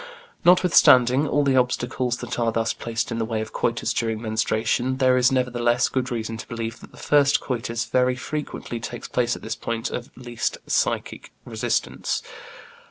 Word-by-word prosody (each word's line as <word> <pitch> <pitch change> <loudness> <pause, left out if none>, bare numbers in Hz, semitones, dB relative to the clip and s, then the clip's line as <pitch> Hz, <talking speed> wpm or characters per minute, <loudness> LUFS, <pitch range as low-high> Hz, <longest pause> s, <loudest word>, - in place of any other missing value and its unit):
Notwithstanding 150 -7 +5
all 145 +1 +2
the 135 -2 +2
obstacles 125 0 0
that 125 0 -5
are 115 -1 +1
thus 115 0 0
placed 115 0 -3
in 115 - -2
the - - 0
way 110 0 -2
of 110 0 -6
coitus 115 0 -1
during 110 -2 -1
menstruation, 110 +3 0
there 130 -1 +4
is 125 +1 +4
nevertheless 120 -1 +1
good 130 -1 -1
reason 115 -2 -3
to - - -9
believe 115 -1 -5
that - - -13
the - - -17
first 145 -1 +3
coitus 115 -2 -3
very 125 +2 +2
frequently 130 -3 -5
takes 120 +1 -6
place 120 -1 0
at - - -11
this - - -3
point 115 -1 -3
of 120 - -5
least 120 -2 -3
psychic - - -1
resistance. - - -2
120 Hz, 170 wpm, -23 LUFS, 115-130 Hz, -, Notwithstanding